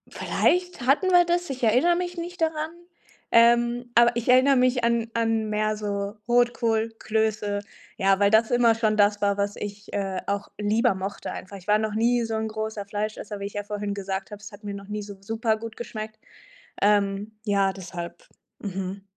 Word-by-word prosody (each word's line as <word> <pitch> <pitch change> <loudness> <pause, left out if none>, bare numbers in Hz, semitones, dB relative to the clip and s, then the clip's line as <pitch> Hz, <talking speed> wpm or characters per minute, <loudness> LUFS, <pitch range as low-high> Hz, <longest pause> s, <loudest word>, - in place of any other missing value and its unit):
Vielleicht 360 -4 0
hatten 280 +10 +3
wir 355 -1 +6
das, 350 0 0
ich 260 -2 -5
erinnere 255 +10 +4
mich 355 0 -3
nicht 345 +1 -6
daran. 315 -1 0 0.6
Ähm, 240 +1 +4
aber 235 0 +6
ich 235 -1 -3
erinnere 260 +2 +5
mich 250 -1 +2
an 235 -1 +1
an 225 -1 0
mehr 215 0 0
so 200 0 -3
Rotkohl, 235 -2 +2
Klöße, 215 -2 0 0.3
ja, 195 0 +2
weil 200 0 +4
das 220 +2 +4
immer 240 -2 +4
schon 215 -2 +1
das 205 0 +3
war, 200 -1 +2
was 200 0 -1
ich, 205 0 -8
äh, 195 -2 -2
auch 200 0 -2
lieber 215 +2 +2
mochte 195 +2 -5
einfach. 190 +2 -8
Ich 190 -2 -11
war 210 0 +5
noch 215 -1 -2
nie 235 +2 +2
so 225 - -4
'n 220 0 -2
großer 215 -1 -4
Fleischesser- 210 0 -4
wie 200 - -4
ich 200 - -6
ja 205 - -3
vorhin 205 0 -4
gesagt 195 0 -4
habe- 210 0 -9
es 215 - -9
hat 205 +1 -13
mir 205 - -4
noch 200 0 -9
nie 210 0 -3
so 205 0 -8
supergut 225 +1 -2
geschmeckt. 215 -2 -7 0.6
Ähm, 205 +1 +2
ja, 200 -2 +2
deshalb. 175 -2 -8 0.3
Mhm. 195 0 -5
215 Hz, 190 wpm, -25 LUFS, 205-240 Hz, 0.6 s, wir